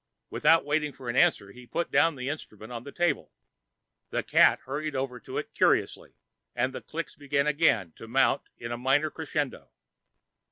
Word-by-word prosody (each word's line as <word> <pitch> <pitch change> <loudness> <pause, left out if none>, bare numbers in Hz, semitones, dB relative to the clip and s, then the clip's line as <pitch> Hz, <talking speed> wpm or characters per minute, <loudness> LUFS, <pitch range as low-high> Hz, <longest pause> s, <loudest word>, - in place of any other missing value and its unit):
Without 165 -2 +4
waiting 150 0 0
for 130 -3 -9
an 120 - -2
answer, 100 -5 +3
he 125 +3 -14
put 170 +6 -2
down 145 +3 +4
the 125 -1 -5
instrument 110 -6 -7
on 120 -1 -6
the 140 - -9
table. 175 +2 0 0.8
The - - -1
cat - - +5
hurried 150 +2 -4
over 130 -2 -3
to - - -7
it - - -4
curiously - - +1 0.4
and 125 +2 0
the - - -6
clicks 165 0 -6
began 140 0 0
again 145 - +2
to 115 - -10
mount 120 0 +2
in 115 0 -6
a 120 - -2
minor 135 +5 +2
crescendo. 145 - -3
135 Hz, 175 wpm, -28 LUFS, 120-150 Hz, 0.8 s, cat